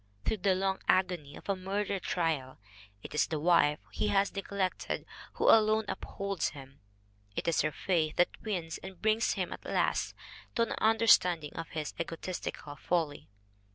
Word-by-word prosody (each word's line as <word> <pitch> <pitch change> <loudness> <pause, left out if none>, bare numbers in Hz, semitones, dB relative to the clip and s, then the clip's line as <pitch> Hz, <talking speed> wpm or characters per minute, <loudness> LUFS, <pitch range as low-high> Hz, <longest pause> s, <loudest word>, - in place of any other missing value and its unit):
Through 220 - +1
the 190 -1 +2
long 190 0 0
agony 180 -6 +1
of - - -12
a 200 - +1
murder 195 +1 -2
trial 160 -8 -1 0.5
it - - -8
is 150 - +2
the 155 - -2
wife 155 -2 +4
he - - -1
has 200 -1 +2
neglected 195 -1 -2 0.3
who - - 0
alone 220 0 +6
upholds 195 -2 -2
him. 135 0 -12 0.6
It - - -3
is 165 - +3
her 155 - 0
faith 155 +1 0
that 175 - +1
wins 175 -7 -3
and 190 - -8
that 180 - -27
brings 220 +1 +3
him - - -2
at - - -10
last - - 0 0.4
to 230 - +3
an 230 - -3
understanding 205 -8 +4
of 165 - -5
his 155 -2 -4
egotistical 165 -3 -5
folly. 160 -5 -1
180 Hz, 165 wpm, -31 LUFS, 160-200 Hz, 0.6 s, alone